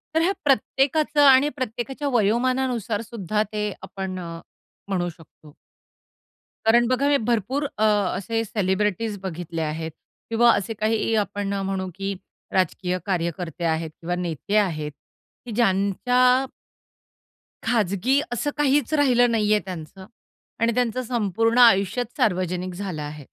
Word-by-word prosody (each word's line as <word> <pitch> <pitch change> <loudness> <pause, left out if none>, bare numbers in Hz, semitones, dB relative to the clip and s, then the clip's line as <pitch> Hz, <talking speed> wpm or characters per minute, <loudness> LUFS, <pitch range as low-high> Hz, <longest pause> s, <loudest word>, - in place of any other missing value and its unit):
तर 320 - +4
ह्या 365 +4 +3
प्रत्येकाचं 285 +3 +2
आणि 270 +2 +6
प्रत्येकाच्या 265 +1 -4
वयोमानानुसार 235 0 +1
सुद्धा 215 -2 -2
ते 210 -1 -2
आपण 190 -1 -5
अ, 170 -1 -7 0.5
म्हणू 180 -3 -1
शकतो. 155 -2 -16 1.1
कारण 235 +2 +5
बघा 255 +3 +1
हे 285 - +4
भरपूर 240 +5 -1
अ, 215 - +1
असे 210 +2 +1
सेलिब्रिटीज 210 +1 -1
बघितले 170 -2 -4
आहेत 160 +1 -3 0.4
किंवा 235 +1 +5
असे 205 +3 -2
काही 220 +1 0
आपण 200 0 -4
म्हणू 195 -1 -2
की 195 0 -3 0.4
राजकीय 185 0 0
कार्यकर्ते 170 -2 -3
आहेत 160 0 0
किंवा 175 +1 -2
नेते 180 +3 -3
आहेत 155 -7 0 0.5
की 235 - -7
ज्यांच्या 245 +5 +3 1.2
खाजगी 225 +3 +2
असं 240 +5 -1
काहीच 295 +1 +2
राहिलं 245 -5 +4
नाहीये 210 -1 +3
त्यांचं 185 +1 -8 0.6
आणि 230 0 +3
त्यांचं 250 0 0
संपूर्ण 225 0 0
आयुष्याच 225 0 +5
सार्वजनिक 180 -2 0
झालं 180 -5 -5
आहे. 150 -1 -7
210 Hz, 125 wpm, -24 LUFS, 185-245 Hz, 1.2 s, आणि